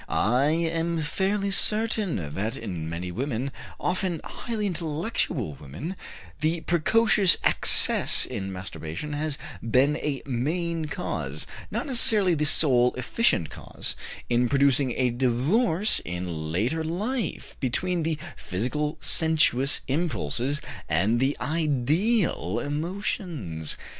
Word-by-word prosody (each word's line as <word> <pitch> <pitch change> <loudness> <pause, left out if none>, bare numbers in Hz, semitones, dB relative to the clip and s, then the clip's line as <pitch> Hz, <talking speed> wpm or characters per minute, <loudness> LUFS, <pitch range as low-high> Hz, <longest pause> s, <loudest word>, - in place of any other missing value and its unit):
I 125 +6 +2
am 165 +1 0
fairly 195 +6 -1
certain 210 - +1
that 105 +6 -2
in 90 -8 -5
many 85 +2 -4
women, 130 +4 -3 0.3
often 180 -3 -1
highly 225 -3 -4
intellectual 160 - -1
women, 75 - -6 0.4
the 160 +2 0
precocious 195 +3 +4
excess - - +5
in 100 -6 -5
masturbation 90 - -6
has 150 -1 -2 0.2
been 130 +6 +2
a 145 -4 -3
main 160 +6 -2
cause, 155 +4 -4 0.2
not - - -3
necessarily 220 -8 +3
the 150 -1 +1
sole 125 -5 +4
efficient 125 - +1
cause, - - -5 0.3
in 120 0 +2
producing 140 -2 +3
a 125 -2 +2
divorce 160 - +2
in 85 -3 -4
later 120 - 0
life 210 +10 -3
between 165 +7 0
the 160 -1 -1 0.2
physical 150 - -2
sensuous 150 -5 +3
impulses 140 - -1 0.3
and 95 +9 +2
the 135 +3 +1
ideal 155 - 0
emotions. 145 - -3
150 Hz, 110 wpm, -26 LUFS, 120-170 Hz, 0.4 s, excess